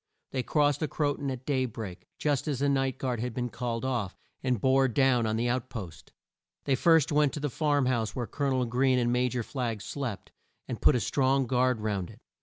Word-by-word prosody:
They 130 - -1
crossed 145 +1 +2
the 155 - 0
Cro 145 -2 0
ton 140 -2 -4
at 130 -1 -5
day 130 -3 +1
break, 105 -6 -8
just 145 -1 0
as 145 -3 0
the 140 +2 +1
night 135 -2 +1
guard 125 -3 -2
had 120 0 -3
been 125 -1 -2
called 120 +1 -3
off, 120 -8 -2 0.2
and 125 -4 0
bore 135 +3 +4
down 125 -2 +3
on 110 - 0
the 115 +2 0
out 125 +1 -1
post. 100 -11 -8 0.5
They 140 - +1
first 160 +2 +4
went 150 -1 +3
to - - -4
the 145 -2 -2
farm 145 -1 +1
house 120 -4 0
where 125 - -2
Col 140 +4 -2
o - - +2
nel 130 -2 +1
Greene 130 +2 +2
and 120 -1 +1
Ma 125 +1 +2
jor 125 -1 -2
Flagg 120 -4 -3
slept, 120 -2 -5 0.4
and - - -5
put - - +5
a - - +2
strong 135 +4 +2
guard 125 -1 +1
round 100 -4 -2
it. - - -14
130 Hz, 230 wpm, -29 LUFS, 120-135 Hz, 0.5 s, put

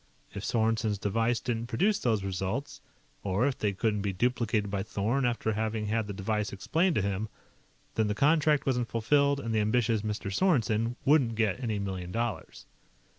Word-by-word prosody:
If 100 - -6
Sorensen's 110 -2 +1
device 115 +4 0
didn't 120 -2 -3
produce 195 - +1
those 110 -5 +1
results, 95 +8 -3 0.4
or 100 +5 +1
if 140 -2 -1
they 105 - +1
couldn't 105 +1 0
be 100 0 -1
duplicated 110 0 0
by 100 -1 -1
Thorn 110 +6 0
after 115 -2 -1
having 110 0 -2
had 110 0 -1
the 100 - -4
device 105 +1 -2
explained 165 - +1
to 105 - +1
him, 100 +2 -2 0.6
then 110 -1 +1
the 105 - -1
contract 150 +3 +3
wasn't 125 -3 0
fulfilled, 140 +5 +2
and 115 -4 -3
the 110 - +2
ambitious 110 0 +2
Mr. 105 -2 -3
Sorensen 120 - +2
wouldn't 135 -6 +4
get 110 -1 +1
any 110 -4 -1
million 95 -3 -4
dollars. 115 0 -4
110 Hz, 175 wpm, -29 LUFS, 105-125 Hz, 0.6 s, wouldn't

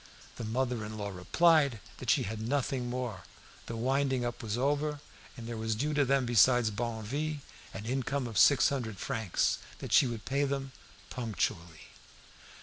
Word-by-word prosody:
The 120 - -5
mother 120 +1 -1
in 110 +1 -6
law 100 -1 -3
replied 140 - +3 0.2
that 130 - -5
she 135 - +4
had 110 0 -4
nothing 125 0 -1
more, 120 -6 -4 0.5
the 115 - -4
winding 130 +1 +1
up 120 +1 -4
was 110 -1 -3
over, 145 +3 0 0.4
and 120 - -8
there 115 -1 -4
was 110 0 -1
due 145 +7 -1
to 145 -1 +3
them 135 -1 +2
besides 120 -1 +4
Barneville 120 +7 -3 0.4
an 100 +2 -6
income 135 +2 -1
of 110 -5 -1
six 145 - +6
hundred 120 -7 -3
francs, 110 -1 0 0.2
that - - -7
she 135 - +6
would 115 -3 -5
pay 140 +1 +1
them 135 -1 -2 0.4
punctually. 95 -9 -3
120 Hz, 165 wpm, -31 LUFS, 110-135 Hz, 0.5 s, six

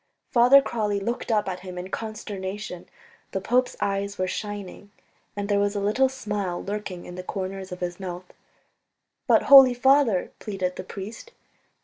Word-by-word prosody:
Father 255 +3 +7
Crawley 210 -5 -1
looked 235 +4 -3
up 210 -2 +1
at 185 -1 -3
him 180 -1 -9
in 180 +1 -6
consternation; 205 -4 -6 0.5
the 195 - 0
pope's 250 +6 +1
eyes 200 0 -2
were 185 - 0
shining, 205 0 -6 0.5
and 205 0 -3
there 205 -1 +2
was 205 0 0
a - - 0
little 215 +7 +2
smile 210 -8 -3
lurking 200 -3 -5
in 180 - -9
the 185 - -6
corners 190 0 -5
of 180 - -7
his 175 0 -4
mouth. 180 -1 -6 1.0
"But, - - +5
Holy 270 -3 +9
Father.. 260 -6 +3
." - - -44
pleaded 190 -4 -3
the - - -6
priest. 215 - -9
200 Hz, 165 wpm, -25 LUFS, 185-225 Hz, 1.0 s, Holy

